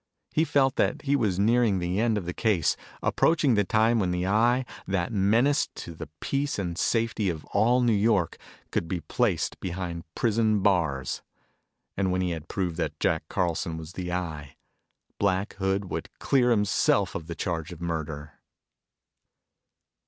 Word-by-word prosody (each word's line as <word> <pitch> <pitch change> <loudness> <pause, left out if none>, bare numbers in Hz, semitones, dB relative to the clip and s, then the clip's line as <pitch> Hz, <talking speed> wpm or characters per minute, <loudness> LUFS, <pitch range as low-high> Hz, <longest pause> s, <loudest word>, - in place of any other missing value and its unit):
He 160 - +2
felt 135 -3 +2
that 150 - +1
he 140 0 +2
was 105 -9 +1
nearing 110 0 +3
the 90 +2 -1
end 115 -1 +2
of 95 - -3
the 90 - -3
case, 105 -7 +1 0.3
approaching 155 -6 +3
the 105 -2 +3
time 110 +3 +3
when 95 -4 +1
the 90 0 -1
Eye, 120 +6 +3 0.2
that 95 +2 -1
menace 115 +9 +3
to 85 - -7
the 80 - -8
peace 140 +1 -1
and 90 -4 -2
safety 115 +1 0
of 80 -3 -5
all 120 +5 +4
New 120 -2 +3
York, 100 -4 +2 0.3
could 85 - -1
be 85 0 -3
placed 75 - 0
behind 85 -2 -4
prison 110 -2 +2
bars. 80 -10 +1 0.7
And 95 -1 0
when 90 0 0
he 90 -1 0
had 80 -1 -5
proved 90 -4 -2
that 75 -3 -3
Jack 80 -1 +1
Carlson 85 -2 -1
was 80 +1 -8
the 90 -2 -4
Eye, 80 -6 -4 0.6
Black 100 0 +1
Hood 95 -1 -1
would - - -4
clear 125 -3 +2
himself 105 -4 +2
of 80 - -5
the 85 - -5
charge 85 -3 -3
of 85 - -9
murder! 80 -3 -5
95 Hz, 165 wpm, -27 LUFS, 85-115 Hz, 0.7 s, all